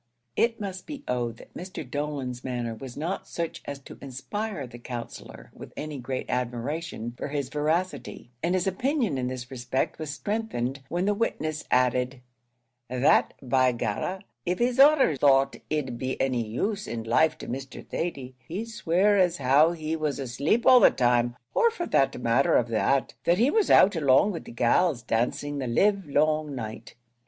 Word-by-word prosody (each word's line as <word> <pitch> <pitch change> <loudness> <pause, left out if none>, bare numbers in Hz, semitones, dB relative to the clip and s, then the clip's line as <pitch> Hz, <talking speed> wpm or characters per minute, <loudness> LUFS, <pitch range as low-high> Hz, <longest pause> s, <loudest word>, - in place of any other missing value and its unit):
It 230 0 +1
must 190 -3 -6
be 290 -3 -7
owned 120 -2 -1
that - - -15
Mr. 180 -6 -7
Dolan's 135 -3 -4
manner 120 -3 -3
was 120 +2 -9
not 165 +6 -3
such 170 -1 -4
as 140 - -5
to - - -12
inspire 140 - -4
the 120 -1 -11
Counsellor 120 -1 -8
with - - -11
any 150 -2 -5
great 130 +1 -4
admiration 125 +1 -3
for - - -5
his 140 -2 -3
veracity, 155 -2 -2
and 175 +2 +1
his 185 - 0
opinion 225 - 0
in 125 - -1
this 125 0 -6
respect 125 0 -2
was 155 -2 -4
strengthened 145 - -3
when 175 +2 -1
the 205 - +2
witness 155 -8 -2
added 125 +1 +2 0.7
"that 125 +2 +3
by 130 0 +3
Garra, 120 - -3 0.3
av 180 - +1
his 245 +2 0
honor 280 - +6
thought 135 0 +4
it'd 135 -6 -2
be 130 0 -3
any 125 -4 0
use 200 - -2
in 115 -1 -4
life 155 +8 +3
to - - -9
Mr. 135 0 -6
Thady, 135 -7 -4
he'd 210 +7 -4
swear 200 0 +2
as 180 -2 +3
how 140 +5 +4
he 160 -1 -3
was 155 -3 -1
asleep 140 - 0
all 255 -1 +8
the - - +8
time; 120 -1 +1 0.2
or 470 - +4
for 400 -7 -4
the 135 - +3
matther 120 +3 +3
of 120 -1 +2
that, 130 +4 +1
that 175 - +4
he 245 +7 +3
was 440 -3 +2
out 195 +1 +6
along 145 +6 +4
wid 170 - -6
de - - -9
gals 120 +3 +2
dancing 125 +6 -1
the 130 - -2
livelong 155 - +1
night." 110 -1 -7
140 Hz, 175 wpm, -27 LUFS, 125-180 Hz, 0.7 s, all